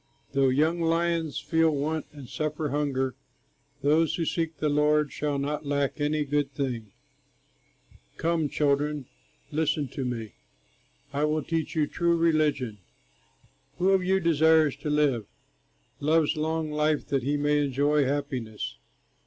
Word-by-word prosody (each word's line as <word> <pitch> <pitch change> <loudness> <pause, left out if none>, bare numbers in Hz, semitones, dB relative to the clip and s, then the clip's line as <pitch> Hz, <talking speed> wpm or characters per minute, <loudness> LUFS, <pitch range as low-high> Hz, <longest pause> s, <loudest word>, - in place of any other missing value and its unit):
Though 135 -1 +3
young 155 +6 +2
lions 165 -2 0
feel 160 +3 +2
want 155 +1 -2
and 145 -4 -11
suffer 155 +2 -2
hunger, 135 -2 0 0.7
Those 160 +2 +3
who 165 - -1
seek 165 0 -2
the 155 - 0
Lord 150 0 +2
shall 145 -1 -2
not 145 +2 -2
lack 140 0 -1
any 150 0 +1
good 145 0 0
thing. 120 -7 -3 1.3
Come, 165 -2 0
children, 145 0 0 0.5
listen 150 -1 0
to 135 +1 -4
me; 115 -6 -4 0.8
I 145 +2 +1
will 155 0 0
teach 165 -1 -2
you 155 -2 +3
true 170 +3 +1
religion: 150 -9 +1 1.0
Who 185 +2 +3
of 190 -1 +3
you 190 +1 +2
desires 160 -4 +4
to 145 +1 -4
live, 140 -8 +1 0.7
Loves 155 +2 +2
long 160 0 -1
life 150 0 +1
that 135 -2 +1
he 145 +3 0
may 145 0 +2
enjoy 145 +2 +2
happiness? 130 -6 -3
150 Hz, 135 wpm, -27 LUFS, 140-160 Hz, 1.3 s, desires